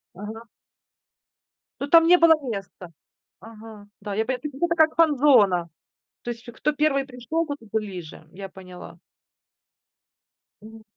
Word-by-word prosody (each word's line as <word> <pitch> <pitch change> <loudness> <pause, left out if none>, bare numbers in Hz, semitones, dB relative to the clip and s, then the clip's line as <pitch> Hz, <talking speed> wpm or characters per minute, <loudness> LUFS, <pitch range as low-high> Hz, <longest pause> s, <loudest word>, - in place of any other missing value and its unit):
Ага. 215 +4 -8 1.4
Ну, 280 - -3
там 330 +2 +6
не 360 +1 +7
было 335 -1 +6 0.2
места. 195 -4 -7 0.5
Ага, 220 -2 -13
да. 205 -1 -5
Я 220 +2 0
пон 260 +1 -2
то 300 - -6
есть, 280 - -14
это 340 -1 +2
как 315 0 +4
фан-зона. 250 - +4 0.6
То 240 - -4
есть, 235 +1 -10
кто 300 +6 -1
1 285 -2 +1
пришёл, 270 +6 -3
тот 285 -1 -6
и 225 - -15
ближе. 185 -7 -6
Я 195 0 -8
поняла. 180 -2 -12 1.6
Мгм. 220 +1 -14
225 Hz, 140 wpm, -24 LUFS, 200-295 Hz, 1.6 s, не